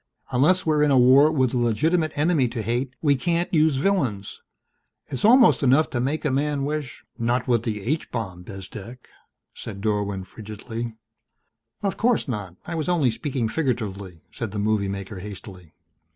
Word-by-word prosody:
Unless 155 +9 +3
we're 155 -2 +2
in 150 - +4
a 135 - +4
war 130 +5 +6
with 130 -6 +1
a 125 - +1
legitimate 155 +8 +1
enemy 150 -3 +2
to 115 -2 -4
hate 125 +3 -2
we 145 -2 +4
can't 170 +7 -1
use 155 -2 +4
villains. 135 - -1 0.7
It's 130 - -4
almost 240 +3 +6
enough 140 +3 +3
to 120 - -1
make 140 +6 -1
a 145 - +2
man 140 +1 0
wish 150 -2 -4
" - - -43
"Not 120 +3 0
with 120 -3 +2
the 105 -3 -4
H 155 +8 -2
bomb, 95 -6 -5
Bezdek," 100 +6 -10 0.4
said 100 - -8
Dorwin 100 -2 -1
frigidly. 110 +3 -7 0.9
"Of 195 - -1
course 240 -5 +1
not 105 -8 -5
I 175 - -5
was 160 0 -2
only 155 -9 +2
speaking 130 -1 -2
figuratively," 105 - -3
said 115 - -5
the 105 - -6
movie 105 -1 0
maker 100 0 -6
hastily. 95 -4 -10
125 Hz, 170 wpm, -24 LUFS, 105-150 Hz, 0.9 s, war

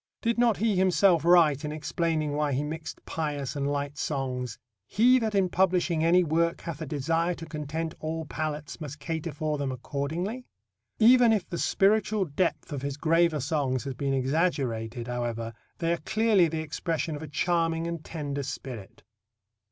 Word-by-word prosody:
Did 230 0 +1
not 235 -4 +4
he 220 -1 +1
himself 185 -2 +4
write, 165 -5 +5
in 150 - -3
explaining 155 0 -1
why 145 -1 0
he 135 +3 0
mixed 155 +2 -6
pious 145 -4 -3
and 140 0 -1
light 145 0 -3
songs; 125 -5 -2 0.3
"He 250 +4 +5
that 220 -3 -1
in 195 -2 +3
publishing 180 -3 +1
any 175 +2 +5
work 170 +1 +1
hath 165 -2 -6
a 155 - -4
desire 165 +5 0
to 165 - -8
content 155 +1 -4
all 160 +1 -3
palates 150 +1 -4
must 145 -1 -6
cater 160 +3 -4
for 150 0 -2
them 140 -2 -1
accordingly"? 160 - -4 0.5
Even 240 +1 +6
if 215 -4 +1
the 170 - -4
spiritual 210 0 +2
depth 170 0 -1
of 140 - -3
his 140 0 -4
graver 165 0 +3
songs 135 -3 -1
has 135 -1 -4
been 135 +1 -1
exaggerated, 130 -5 -1
however, 120 -2 -3 0.2
they 170 0 +1
are - - -1
clearly 215 0 +3
the 160 0 -3
expression 160 +1 -2
of 145 - -7
a 155 - -6
charming 165 +1 0
and 170 -2 -4
tender 145 -3 -4
spirit. 125 -6 -7
155 Hz, 170 wpm, -28 LUFS, 140-175 Hz, 0.5 s, Even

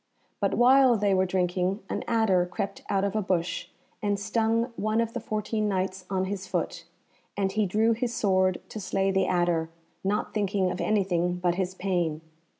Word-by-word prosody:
But - - +1
while 255 0 +6
they 205 -1 +2
were 190 0 +2
drinking 180 +2 0
an - - -3
adder 195 -6 +2
crept 195 +2 -4
out 195 -1 +1
of 200 +1 -1
a 215 - +2
bush, 180 -3 -1 0.3
and 205 -1 0
stung 225 +3 0
one 215 +1 0
of 230 0 0
the 245 - -2
fourteen 215 -1 -2
Knights 190 -1 -2
on 190 -1 0
his 190 0 -4
foot, 170 -1 -3 0.5
and 195 -1 +1
he 210 0 +1
drew 220 +5 +2
his 235 +1 -1
sword 185 -4 +2
to 215 - -6
slay 195 0 0
the 190 -1 +2
adder, 175 -2 +1 0.3
not 205 +2 -1
thinking 200 -3 0
of 180 - -4
anything 180 -4 +1
but 180 -1 +1
his 185 0 -2
pain. 175 -5 -1
195 Hz, 180 wpm, -27 LUFS, 185-215 Hz, 0.5 s, while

